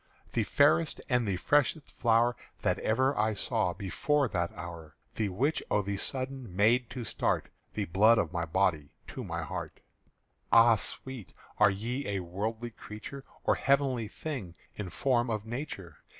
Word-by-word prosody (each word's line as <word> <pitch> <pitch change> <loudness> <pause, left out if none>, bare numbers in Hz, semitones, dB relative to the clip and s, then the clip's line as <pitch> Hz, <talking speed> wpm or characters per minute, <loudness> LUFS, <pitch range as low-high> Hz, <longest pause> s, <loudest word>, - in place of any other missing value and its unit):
"_The 115 - +2
fairest 150 +2 +3
and 125 -3 +2
the 100 - +1
freshest 145 - +1
flower 120 +1 +3 0.3
That - - +1
ever 130 +5 +2
I 110 0 +1
saw 110 -3 0
before 130 - 0
that 85 -3 -1
hour, 80 -2 -8 0.2
The 110 -2 -1
which 130 +12 0
o' 105 - +2
the 100 +1 -2
sudden 130 -5 -3
made 115 +4 +3
to 125 - -5
start - - 0 0.3
The 105 - -1
blood 105 +6 +5
of 85 -3 0
my 85 -1 -1
body 80 -4 +1 0.2
to - - -6
my - - -3
heart._ - - -6 0.7
_Ah 115 -1 +7
sweet, 130 -3 -5 0.3
are - - +7
ye 115 +8 -3
a 100 -2 -1
worldly 110 +7 -4
creature 110 +6 -9 0.2
Or - - +4
heavenly 135 -4 +2
thing 110 - -6 0.2
in 105 -3 -5
form 120 +2 +1
of 110 -2 -2
nature? 110 - -6
110 Hz, 160 wpm, -30 LUFS, 95-130 Hz, 0.7 s, Ah